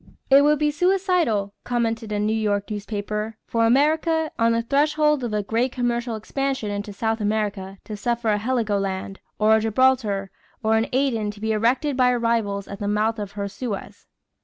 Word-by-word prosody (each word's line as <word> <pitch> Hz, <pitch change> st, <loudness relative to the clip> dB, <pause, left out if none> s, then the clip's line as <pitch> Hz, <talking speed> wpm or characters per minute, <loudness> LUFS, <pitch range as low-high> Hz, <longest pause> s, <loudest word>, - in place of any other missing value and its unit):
"It 275 Hz, +1 st, +8 dB
would 300 Hz, +1 st, +4 dB
be 300 Hz, +1 st, +1 dB
suicidal," 355 Hz, -, +1 dB
commented 230 Hz, -2 st, -1 dB
a 210 Hz, -, 0 dB
New 210 Hz, +1 st, 0 dB
York 210 Hz, -1 st, -1 dB
newspaper, 210 Hz, +1 st, -4 dB
"for 230 Hz, -1 st, +1 dB
America, 315 Hz, +5 st, +2 dB
on 230 Hz, 0 st, +4 dB
the 230 Hz, 0 st, +1 dB
threshold 300 Hz, +2 st, +2 dB
of 235 Hz, -, -2 dB
a 210 Hz, -1 st, -1 dB
great 230 Hz, +5 st, 0 dB
commercial 240 Hz, -2 st, -1 dB
expansion 265 Hz, 0 st, -2 dB
in 205 Hz, 0 st, -3 dB
South 220 Hz, +2 st, -2 dB
America, 205 Hz, -2 st, -2 dB
to 215 Hz, -, -6 dB
suffer 235 Hz, +2 st, -1 dB
a 210 Hz, -1 st, +2 dB
Heligoland, 200 Hz, -5 st, -1 dB, 0.2 s
or 215 Hz, +1 st, +4 dB
a -, -, +3 dB
Gibraltar, 220 Hz, -4 st, +1 dB, 0.3 s
or 220 Hz, 0 st, +3 dB
an 225 Hz, +2 st, +1 dB
Aden 250 Hz, -5 st, +1 dB
to 205 Hz, 0 st, -8 dB
be 220 Hz, +1 st, -1 dB
erected 245 Hz, +7 st, +1 dB
by 250 Hz, -1 st, +4 dB
her 250 Hz, -, +2 dB
rivals 225 Hz, -4 st, 0 dB
at 200 Hz, -, -8 dB
the 205 Hz, -, -3 dB
mouth 215 Hz, +2 st, 0 dB
of 205 Hz, -1 st, -5 dB
her 200 Hz, -1 st, -3 dB
Suez." 205 Hz, -2 st, -6 dB
225 Hz, 185 wpm, -23 LUFS, 210-255 Hz, 0.3 s, It